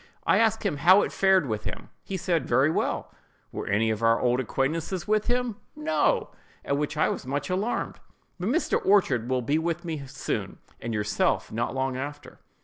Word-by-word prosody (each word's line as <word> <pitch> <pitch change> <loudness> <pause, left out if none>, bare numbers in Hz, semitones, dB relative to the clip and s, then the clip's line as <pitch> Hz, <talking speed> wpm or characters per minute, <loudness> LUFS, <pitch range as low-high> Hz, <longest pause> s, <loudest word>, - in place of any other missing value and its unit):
I - - +4
asked 225 0 +2
him 170 -8 0
how 185 +8 +6
it - - -3
fared 190 -3 +3
with 110 -2 -3
him. - - -6
He 195 - -4
said, 175 -3 0
"Very 130 +5 +3
well."—"Were - - -5
any 110 +2 +2
of 110 0 -3
our 115 0 +4
old 125 0 +2
acquaintances 155 - -2
with 215 0 +1
him?"—"No!" 250 - 0 0.3
(at 140 - +1
which 150 +1 -2
I 155 - +3
was - - -4
much 145 +4 -2
alarmed), 200 +6 -2 0.4
"but 180 +4 -1
Mr. 320 +8 +1
Orchard 155 - +3
will 130 -1 0
be 145 +6 +1
with 170 +1 -2
me 155 -5 -4
soon, 135 +1 -4 0.2
and 115 - -4
yourself 105 -1 0
not 120 +4 -2
long 130 -1 -1
after." 145 +2 -7
150 Hz, 180 wpm, -26 LUFS, 130-190 Hz, 0.4 s, how